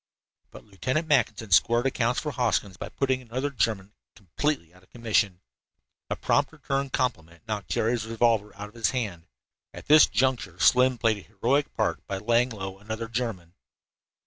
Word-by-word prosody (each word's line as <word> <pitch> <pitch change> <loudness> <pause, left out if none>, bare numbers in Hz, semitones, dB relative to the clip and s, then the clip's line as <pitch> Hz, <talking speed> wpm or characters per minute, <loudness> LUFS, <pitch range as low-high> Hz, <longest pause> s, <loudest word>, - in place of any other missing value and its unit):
But - - -13
Lieutenant 130 - -2
Mackinson 125 -7 +1
squared 120 +7 +4
accounts 125 -2 +1
for 150 - -4
Hoskins 115 -7 0
by - - -7
putting 130 -1 -1
another 130 +4 -3
German 105 -5 -1 0.2
completely 105 - -3
out 90 - -20
of 95 - -26
commission. 105 -6 0 0.7
A - - -1
prompt 140 -1 +1
return 140 -2 -3
compliment 85 -8 -3
knocked 105 -2 -4
Jerry's 115 0 0
revolver 115 -2 +1
out 105 - -7
of 105 - -18
his 115 -3 0
hand. 105 -10 -4 0.5
At - - -10
this 150 0 +7
juncture 125 -9 0
Slim 125 +7 +4
played 110 -2 +2
a - - -11
heroic 120 +9 0
part - - -1
by 100 - -3
laying 120 +5 +2
low 95 -4 -7
another 110 +2 -5
German. 110 -8 -4
115 Hz, 165 wpm, -26 LUFS, 100-130 Hz, 0.7 s, this